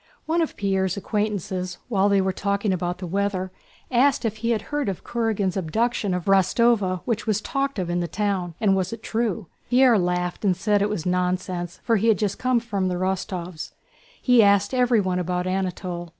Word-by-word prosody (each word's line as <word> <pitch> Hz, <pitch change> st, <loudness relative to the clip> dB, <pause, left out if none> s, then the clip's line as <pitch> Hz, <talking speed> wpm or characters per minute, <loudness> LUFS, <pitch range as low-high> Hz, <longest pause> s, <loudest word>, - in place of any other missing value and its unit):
One 330 Hz, +2 st, +1 dB
of 325 Hz, -, -2 dB
Pierre's 190 Hz, -1 st, 0 dB
acquaintances, 200 Hz, -3 st, -2 dB
while 205 Hz, -4 st, +2 dB
they 200 Hz, -1 st, +4 dB
were 190 Hz, 0 st, 0 dB
talking 200 Hz, +1 st, 0 dB
about 180 Hz, 0 st, -2 dB
the 185 Hz, -, -6 dB
weather, 190 Hz, 0 st, -1 dB, 0.4 s
asked 265 Hz, +1 st, +3 dB
if 220 Hz, -1 st, -1 dB
he 230 Hz, +1 st, -2 dB
had 225 Hz, -2 st, 0 dB
heard 290 Hz, -7 st, 0 dB
of 190 Hz, -, -5 dB
Kurágin's 220 Hz, -6 st, -1 dB
abduction 200 Hz, +2 st, 0 dB
of 180 Hz, -, -4 dB
Rostóva 195 Hz, 0 st, +3 dB
which 230 Hz, -2 st, -2 dB
was 215 Hz, -2 st, +2 dB
talked 275 Hz, +2 st, -2 dB
of 185 Hz, -3 st, -2 dB
in 175 Hz, 0 st, -1 dB
the 175 Hz, -, -1 dB
town, 185 Hz, -1 st, -2 dB
and 200 Hz, -3 st, +3 dB
was 185 Hz, -1 st, -1 dB
it 230 Hz, -1 st, -7 dB
true? 225 Hz, -2 st, -1 dB, 0.2 s
Pierre 250 Hz, -3 st, +5 dB
laughed 180 Hz, +1 st, -1 dB
and 190 Hz, -3 st, +2 dB
said 205 Hz, +2 st, +1 dB
it 205 Hz, -, +1 dB
was 195 Hz, -7 st, -3 dB
nonsense 180 Hz, -1 st, -1 dB
for 230 Hz, -2 st, +2 dB
he 215 Hz, +3 st, +1 dB
had 220 Hz, -3 st, +4 dB
just 205 Hz, -1 st, -2 dB
come 255 Hz, -1 st, +2 dB
from 205 Hz, -5 st, -2 dB
the 180 Hz, -, -1 dB
Rostóvs'. 180 Hz, -2 st, -3 dB, 0.5 s
He 245 Hz, -2 st, +5 dB
asked 200 Hz, +1 st, +3 dB
everyone 230 Hz, -8 st, +2 dB
about 180 Hz, 0 st, -1 dB
Anatole. 180 Hz, -2 st, -3 dB
195 Hz, 195 wpm, -24 LUFS, 180-225 Hz, 0.5 s, Pierre